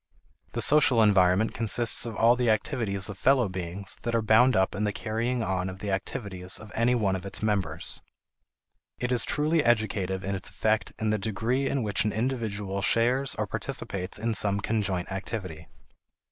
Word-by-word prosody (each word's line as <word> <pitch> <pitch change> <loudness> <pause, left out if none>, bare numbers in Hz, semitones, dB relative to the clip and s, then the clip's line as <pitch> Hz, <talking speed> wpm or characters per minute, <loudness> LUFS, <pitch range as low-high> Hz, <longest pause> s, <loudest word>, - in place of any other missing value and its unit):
The - - +2
social 135 -6 +5
environment 100 0 +3
consists 115 +1 +1
of 115 - -6
all 115 +3 +4
the 125 -1 +1
activities 110 -4 0
of 105 -3 -8
fellow 130 -4 +3
beings 95 +1 -6
that 115 0 -2
are 115 - +2
bound 110 +3 +5
up 95 0 +2
in 105 - -3
the 105 - +1
carrying 115 +3 -2
on 95 -2 -1
of 95 - -8
the 100 +1 -4
activities 95 -1 -2
of 110 -1 -11
any 120 +2 +2
one 100 -5 +1
of 95 - -5
its 100 +2 -5
members. 95 -7 -1 1.0
It 125 0 -2
is 125 - +3
truly 155 +1 +1
educative 100 -5 0
in 100 - -2
its 95 -1 -5
effect 110 0 0
in 110 -1 -1
the 110 - 0
degree 115 +6 -1
in 140 -3 -1
which 105 -2 0
an 105 - -1
individual 105 -5 -2
shares 120 +5 +1
or - - -1
participates 90 -2 -4
in 115 +2 -1
some 100 -2 +1
conjoint 100 -4 -2
activity. 95 -5 -5
105 Hz, 180 wpm, -27 LUFS, 95-115 Hz, 1.0 s, social